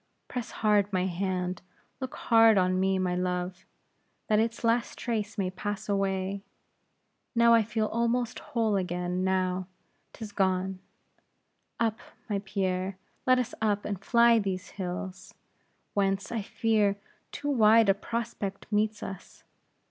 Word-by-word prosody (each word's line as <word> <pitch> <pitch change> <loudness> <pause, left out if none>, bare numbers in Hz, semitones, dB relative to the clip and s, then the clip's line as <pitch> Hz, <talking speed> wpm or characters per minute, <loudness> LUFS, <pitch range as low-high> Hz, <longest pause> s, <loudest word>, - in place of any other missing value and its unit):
Press 245 -2 -4
hard 205 -2 +2
my 185 -1 +1
hand; 185 0 -2 0.4
look 260 -2 -5
hard 225 -2 +5
on 185 0 +2
me, 190 0 +2
my 180 -1 0
love, 180 +1 -2 0.6
that 215 -1 +4
its 230 +1 -1
last 230 +1 +1
trace 220 -3 -3
may 185 -2 0
pass 205 +2 -4
away. 195 -1 -1 0.9
Now 235 0 +6
I 230 - +6
feel 215 0 -1
almost 235 +2 0
whole 220 -3 0
again; 180 0 -2
now, 185 -1 0 0.4
'tis 220 -2 -8
gone. 190 -1 0 1.0
Up, 225 0 +1 0.3
my 205 -3 -1
Pierre; 190 -1 -2 0.3
let 255 0 +6
us 250 -1 -1
up, 210 -2 +1
and 200 -2 -4
fly 235 0 +5
these 195 -2 -3
hills, 185 0 -6 0.6
whence, 195 -1 0
I 230 -2 -1
fear, 210 -1 +1 0.3
too 290 0 -3
wide 225 -3 +6
a 195 - +6
prospect 210 -2 -4
meets 210 0 +1
us. 190 -1 -9
200 Hz, 135 wpm, -28 LUFS, 185-225 Hz, 1.0 s, Now